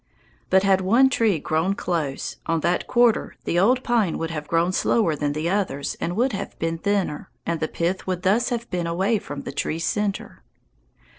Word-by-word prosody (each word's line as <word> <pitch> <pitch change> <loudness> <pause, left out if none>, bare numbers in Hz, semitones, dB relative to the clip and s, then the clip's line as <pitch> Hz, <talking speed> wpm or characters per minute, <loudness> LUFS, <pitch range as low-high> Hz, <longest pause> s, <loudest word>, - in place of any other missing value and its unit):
But 190 0 +4
had 195 -1 +3
one 240 +8 +4
tree 225 -7 +2
grown 160 +6 0
close, 155 -8 -3
on 165 -1 +1
that 175 +3 0
quarter 240 -2 +2
the 175 - +1
old 250 +7 +3
pine 225 -8 +1
would 165 0 -3
have 150 -2 -5
grown 170 +2 +2
slower 185 -3 +2
than 145 0 -1
the 155 +3 -2
others 175 -7 -1
and 175 - -2
would 250 +3 +1
have 195 - -5
been 165 0 -2
thinner, 195 -6 -1 0.2
and 170 -1 -1
the 160 - -1
pith 175 +5 -2
would 185 -1 -2
thus 210 +7 +2
have 235 -1 -3
been 175 -2 -1
away 190 +6 +1
from 145 -5 -7
the - - -5
tree's 160 +4 -2
centre. 210 -1 -2
180 Hz, 195 wpm, -23 LUFS, 165-210 Hz, 0.2 s, But